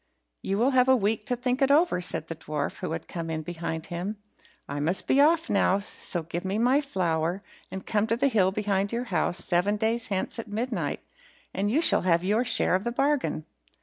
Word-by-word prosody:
"You 195 Hz, -, -2 dB
will 245 Hz, +5 st, +3 dB
have 255 Hz, -1 st, +4 dB
a 260 Hz, -, +7 dB
week 215 Hz, -1 st, 0 dB
to 250 Hz, -3 st, 0 dB
think 250 Hz, +2 st, -1 dB
it 270 Hz, -, +4 dB
over 320 Hz, -, +4 dB
in," -, -, -4 dB
said 165 Hz, -, -1 dB
the 165 Hz, -, -5 dB
dwarf, 150 Hz, -2 st, -4 dB
who -, -, -4 dB
had 165 Hz, -, -6 dB
come 165 Hz, -2 st, -5 dB
in 160 Hz, -1 st, -3 dB
behind 160 Hz, -1 st, -5 dB
him; 190 Hz, +5 st, -4 dB, 0.5 s
"I 140 Hz, +1 st, -4 dB
must 165 Hz, +6 st, +3 dB
be 275 Hz, -, +4 dB
off 330 Hz, +2 st, +3 dB
now, 195 Hz, -1 st, +2 dB
so 190 Hz, -3 st, -4 dB
give 170 Hz, +2 st, -5 dB
me 195 Hz, +2 st, -2 dB
my 250 Hz, +5 st, +3 dB
flour, 180 Hz, -, -1 dB, 0.3 s
and 190 Hz, 0 st, -7 dB
come 215 Hz, 0 st, 0 dB
to 230 Hz, +1 st, 0 dB
the 280 Hz, +3 st, +2 dB
hill 200 Hz, -7 st, +3 dB
behind 200 Hz, -1 st, -1 dB
your 235 Hz, +1 st, -2 dB
house 175 Hz, +2 st, +1 dB
seven 190 Hz, +4 st, +1 dB
days 225 Hz, +2 st, 0 dB
hence 195 Hz, +3 st, -2 dB
at 230 Hz, -, -6 dB
midnight, 225 Hz, +5 st, -3 dB, 0.5 s
and 200 Hz, +2 st, -1 dB
you 300 Hz, +9 st, +2 dB
shall -, -, +4 dB
have 170 Hz, -1 st, +2 dB
your 210 Hz, +6 st, +2 dB
share 225 Hz, -, +2 dB
of 185 Hz, +2 st, +1 dB
the 240 Hz, -, -2 dB
bargain." 270 Hz, -, 0 dB
205 Hz, 220 wpm, -27 LUFS, 175-245 Hz, 0.5 s, a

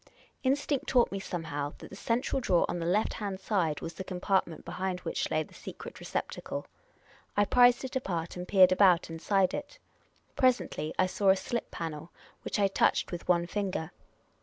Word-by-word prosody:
Instinct 280 Hz, +1 st, 0 dB
taught 245 Hz, -2 st, +3 dB
me 195 Hz, -, -3 dB
somehow 150 Hz, -6 st, -4 dB
that -, -, -12 dB
the -, -, -8 dB
central 235 Hz, +6 st, -1 dB
drawer 180 Hz, -8 st, +3 dB
on 175 Hz, -, -3 dB
the 165 Hz, -, -2 dB
left 205 Hz, +5 st, +2 dB
hand 200 Hz, -3 st, -4 dB
side 175 Hz, -8 st, 0 dB
was 165 Hz, -, -5 dB
the 180 Hz, -, -6 dB
compartment 185 Hz, -2 st, -1 dB
behind 185 Hz, -1 st, -3 dB
which -, -, -2 dB
lay -, -, +1 dB
the -, -, -18 dB
secret -, -, -9 dB
receptacle. -, -, -4 dB, 0.7 s
I 205 Hz, -, +5 dB
prised 245 Hz, +3 st, +5 dB
it 260 Hz, -, -6 dB
apart 175 Hz, -10 st, -2 dB
and 180 Hz, 0 st, -6 dB
peered 190 Hz, -2 st, +6 dB
about 185 Hz, -3 st, +4 dB
inside 185 Hz, +3 st, +1 dB
it. 290 Hz, 0 st, -6 dB, 0.6 s
Presently 250 Hz, -, +1 dB
I 185 Hz, -, +4 dB
saw 195 Hz, +1 st, +1 dB
a 190 Hz, -, +7 dB
slip 235 Hz, +4 st, -3 dB
panel, 160 Hz, 0 st, -6 dB, 0.3 s
which -, -, -3 dB
I 200 Hz, -1 st, +4 dB
touched 195 Hz, -, +1 dB
with 175 Hz, -1 st, -6 dB
one 175 Hz, -1 st, +3 dB
finger. 185 Hz, -4 st, -3 dB
190 Hz, 180 wpm, -30 LUFS, 170-210 Hz, 0.7 s, a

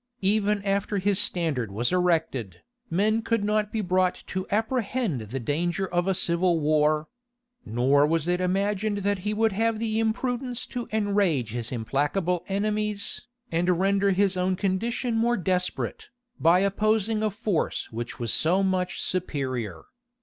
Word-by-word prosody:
Even 205 Hz, +1 st, +2 dB
after 200 Hz, +1 st, 0 dB
his 200 Hz, 0 st, +1 dB
standard 160 Hz, -, 0 dB
was 115 Hz, -, 0 dB
erected, 160 Hz, -, 0 dB, 0.3 s
men 215 Hz, +5 st, +2 dB
could 230 Hz, -2 st, 0 dB
not 210 Hz, 0 st, 0 dB
be 220 Hz, -, -1 dB
brought 185 Hz, -1 st, +1 dB
to 185 Hz, +1 st, -4 dB
apprehend 225 Hz, -, -1 dB
the 110 Hz, +5 st, -5 dB
danger 170 Hz, +9 st, -1 dB
of 175 Hz, 0 st, -1 dB
a 190 Hz, -, +2 dB
civil 170 Hz, -1 st, +2 dB
war; 155 Hz, 0 st, +2 dB, 0.6 s
nor 135 Hz, +5 st, +3 dB
was 165 Hz, 0 st, 0 dB
it 180 Hz, +1 st, +1 dB
imagined 200 Hz, +3 st, 0 dB
that 205 Hz, -1 st, +1 dB
he 210 Hz, +3 st, -2 dB
would 220 Hz, +1 st, +2 dB
have 225 Hz, +3 st, 0 dB
the 220 Hz, 0 st, -1 dB
imprudence 245 Hz, +2 st, -1 dB
to 245 Hz, -2 st, -5 dB
enrage 200 Hz, -, +1 dB
his 120 Hz, 0 st, -4 dB
implacable 145 Hz, -, -1 dB
enemies, 210 Hz, +1 st, -2 dB, 0.2 s
and 175 Hz, +1 st, +2 dB
render 200 Hz, +1 st, +2 dB
his 195 Hz, 0 st, +2 dB
own 185 Hz, +1 st, +1 dB
condition 225 Hz, +6 st, -1 dB
more 235 Hz, 0 st, +2 dB
desperate, 180 Hz, -1 st, -2 dB, 0.3 s
by 170 Hz, +3 st, +5 dB
opposing 215 Hz, +2 st, +1 dB
a 215 Hz, -, +2 dB
force 210 Hz, -4 st, -2 dB
which 120 Hz, +1 st, -5 dB
was 115 Hz, -2 st, 0 dB
so 180 Hz, +5 st, +3 dB
much 185 Hz, -1 st, 0 dB
superior. 130 Hz, -, -2 dB
190 Hz, 150 wpm, -26 LUFS, 165-210 Hz, 0.6 s, by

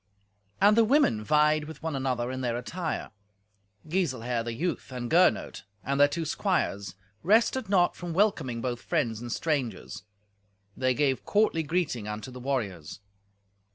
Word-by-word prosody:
And 205 Hz, +2 st, +6 dB
the 230 Hz, -, +6 dB
women 220 Hz, -, +3 dB
vied 150 Hz, +3 st, +3 dB
with 160 Hz, +1 st, -11 dB
one 160 Hz, -3 st, -2 dB
another 130 Hz, -2 st, -1 dB
in 130 Hz, 0 st, -4 dB
their 120 Hz, -2 st, -1 dB
attire. 160 Hz, +7 st, -4 dB, 0.8 s
Giselher, 130 Hz, -9 st, -1 dB
the 120 Hz, -, -4 dB
youth, 165 Hz, +2 st, -3 dB
and 125 Hz, -2 st, -5 dB
Gernot, 175 Hz, +2 st, +3 dB, 0.2 s
and 140 Hz, +1 st, -1 dB
their 145 Hz, -, +7 dB
two 160 Hz, +3 st, -3 dB
squires, 100 Hz, -, -1 dB, 0.3 s
rested 225 Hz, +5 st, +2 dB
not 180 Hz, -3 st, +3 dB
from 175 Hz, -1 st, -6 dB
welcoming 160 Hz, -, +1 dB
both 120 Hz, -1 st, -3 dB
friends 115 Hz, -2 st, -1 dB
and 120 Hz, -1 st, -6 dB
strangers. 130 Hz, -, -2 dB, 0.7 s
They 130 Hz, -1 st, +1 dB
gave 135 Hz, -2 st, +1 dB
courtly 210 Hz, -6 st, +2 dB
greeting 150 Hz, -, -2 dB
unto 105 Hz, +5 st, -6 dB
the 125 Hz, -, -9 dB
warriors. 105 Hz, -, -3 dB
140 Hz, 150 wpm, -28 LUFS, 120-170 Hz, 0.8 s, their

